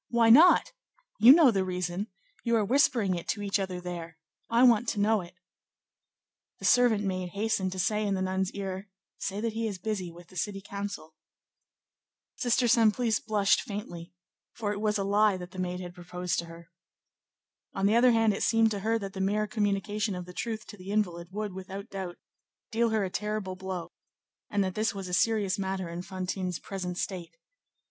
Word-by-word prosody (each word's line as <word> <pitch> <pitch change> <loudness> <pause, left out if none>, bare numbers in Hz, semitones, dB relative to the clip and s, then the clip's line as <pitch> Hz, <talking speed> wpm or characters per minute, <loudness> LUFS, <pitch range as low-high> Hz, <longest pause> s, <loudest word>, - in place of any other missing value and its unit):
Why 230 -1 +4
not? 320 +10 +7 0.5
You 230 +4 +10
know 300 -3 +7
the 195 -3 +1
reason. 180 +2 -3 0.4
You 235 -1 +2
are 215 -2 +2
whispering 235 -5 +3
it 170 -1 -5
to 205 - -2
each 200 0 0
other 185 -2 -3
there. 170 -2 -7 0.3
I 235 +2 +4
want 240 -2 +5
to 215 - -1
know 215 0 +3
it." 175 +1 -12 1.2
The - - -7
servant 240 -4 +4
maid 185 -2 -3
hastened 200 -2 0
to - - -7
say 210 +3 0
in 200 - +1
the 190 - -2
nun's 190 0 0
ear, 195 0 -5 0.3
"Say 200 +1 -3
that 230 -1 -1
he 225 0 -1
is 200 -3 -4
busy 185 -2 -3
with 175 0 -15
the 185 - -16
city 195 +3 -2
council." 200 -5 -6 1.2
Sister 245 -1 +1
Simplice 225 0 +3
blushed 210 -3 +2
faintly, 175 -5 -7 0.4
for 210 -3 -2
it 205 0 -4
was 215 -1 +1
a 200 - -1
lie 205 0 +3
that 180 0 -9
the 185 - -8
maid 180 0 -2
had 175 -1 -7
proposed 180 0 -3
to 170 - -4
her. 165 +1 -13 1.0
On 195 - 0
the 210 +3 +4
other 245 +1 +6
hand, 225 -2 +3
it - - -4
seemed 225 -1 +3
to 205 - -2
her 225 +3 +1
that 195 -3 -6
the 190 - -4
mere 210 +2 +1
communication 205 -1 -1
of 180 -1 -6
the 180 - -11
truth 220 +2 -4
to 210 - -10
the 185 +1 -10
invalid 175 -5 -1
would, 205 0 -4
without 190 +1 -8
doubt, 185 -3 -5 0.5
deal 230 +1 +2
her 220 -2 +1
a 185 - -5
terrible 210 -2 -3
blow, 185 -2 -5 0.6
and 205 -1 +1
that 185 -1 -2
this 215 0 -1
was 195 -2 -5
a 180 - -6
serious 205 0 +2
matter 190 -2 -2
in 170 +1 -5
Fantine's 185 -1 -3
present 180 -2 -5
state. 180 - -5
200 Hz, 195 wpm, -29 LUFS, 185-215 Hz, 1.2 s, You